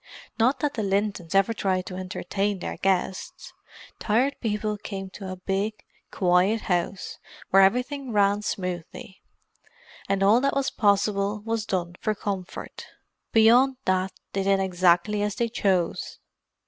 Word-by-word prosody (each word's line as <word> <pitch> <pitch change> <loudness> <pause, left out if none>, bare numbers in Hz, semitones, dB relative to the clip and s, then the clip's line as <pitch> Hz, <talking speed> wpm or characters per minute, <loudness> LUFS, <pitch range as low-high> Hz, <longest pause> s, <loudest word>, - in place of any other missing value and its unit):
Not 250 +4 +2
that 290 -1 0
the 225 - -3
Lintons 200 -3 -1
ever 195 +4 +4
tried 185 -4 -1
to 185 - -7
entertain 195 +2 -2
their 180 - -5
guests. 190 0 -2 0.5
Tired 245 +6 +1
People 210 -1 -1
came 195 -2 -7
to 190 -2 -7
a - - -4
big, 195 +3 -3 0.2
quiet 185 +4 +2
house, 180 +1 -2 0.3
where 195 - +7
everything 250 +6 +1
ran 205 -1 +3
smoothly, 185 -1 -5 0.9
and 195 0 +1
all 215 +5 +5
that 275 0 +1
was 275 -1 0
possible 200 0 +1
was 225 -2 -2
done 175 -2 -2
for 215 - 0
comfort. 195 -3 -6 0.4
Beyond 245 +4 +5
that, 185 0 +1 0.2
they 195 - 0
did 195 0 +2
exactly 185 +2 +2
as 205 0 -1
they 235 -1 0
chose. 190 -6 -1
200 Hz, 140 wpm, -25 LUFS, 185-220 Hz, 0.9 s, where